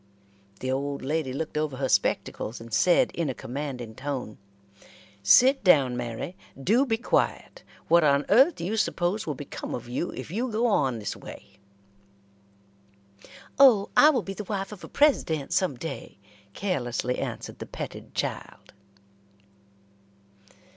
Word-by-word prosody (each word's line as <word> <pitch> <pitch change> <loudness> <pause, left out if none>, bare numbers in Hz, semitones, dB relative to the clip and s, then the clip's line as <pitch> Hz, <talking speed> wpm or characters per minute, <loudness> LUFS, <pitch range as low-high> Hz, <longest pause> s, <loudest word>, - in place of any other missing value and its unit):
The 130 - -2
old 140 +1 -2
lady 150 -1 -1
looked 150 +3 -3
over 150 -4 -2
her 135 0 -1
spectacles, 115 -2 0
and 115 0 -11
said, 175 +9 +4
in 165 -4 -2
a 130 - -3
commanding 125 -2 -6
tone: 130 -3 -5 0.8
"Sit 255 - +5
down, 140 -9 +5
Mary. 120 +8 -5 0.2
Do 230 - +2
be 225 -2 +1
quiet. 380 - -1 0.3
What 170 0 +5
on 140 -1 +3
earth 270 +10 +5
do 170 - -6
you 215 +5 -2
suppose 190 -1 0
will 150 - -2
become 140 +1 -6
of 120 - -8
you 125 +8 -2
if - - -8
you 240 +7 -2
go 225 +3 0
on 135 - +2
this 105 -3 -4
way?" - - -12 2.0
"Oh, 235 -8 +6
I 300 - +8
will 255 -8 +1
be 195 - -5
the 210 +1 -7
wife 195 0 -3
of 210 - -10
a - - -7
President 170 - +1
some 180 -8 +1
day," 135 -6 -7 0.4
carelessly 125 -9 -2
answered - - -5
the - - -7
petted - - -8
child. - - -5
155 Hz, 145 wpm, -26 LUFS, 130-210 Hz, 2.0 s, I